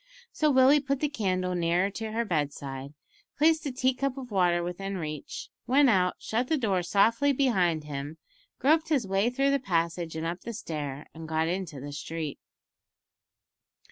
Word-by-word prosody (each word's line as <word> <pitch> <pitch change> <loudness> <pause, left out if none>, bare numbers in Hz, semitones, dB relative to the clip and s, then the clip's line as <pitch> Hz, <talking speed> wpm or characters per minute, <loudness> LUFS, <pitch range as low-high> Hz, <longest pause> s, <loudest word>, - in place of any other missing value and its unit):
So 305 - +2
Willie 265 +1 +6
put 275 -1 -1
the 300 - +1
candle 185 -8 -1
nearer 175 +3 +1
to 220 +2 -5
her 230 +2 -1
bedside, 140 -4 -3 0.4
placed 315 0 +3
a - - -2
tea 255 +1 +1
cup 275 +1 -2
of 255 -3 -7
water 175 -3 +2
within 195 +3 -4
reach, 155 -3 -6 0.2
went 270 0 +5
out, 180 -3 +2
shut 240 +3 -2
the 315 - +1
door 200 -8 +1
softly 225 +10 +3
behind 185 - +2
him, 145 +1 -6 0.4
groped 315 +5 +3
his 280 -8 +2
way 195 +4 +2
through 275 +3 +1
the 280 - +2
passage 170 -6 -1
and 160 +1 -3
up 170 +2 -3
the 235 - -6
stair, 150 -8 -5
and 160 0 -9
got 160 0 +1
into 175 -5 -3
the 145 +2 -7
street. 155 0 -5
190 Hz, 175 wpm, -28 LUFS, 165-260 Hz, 0.4 s, Willie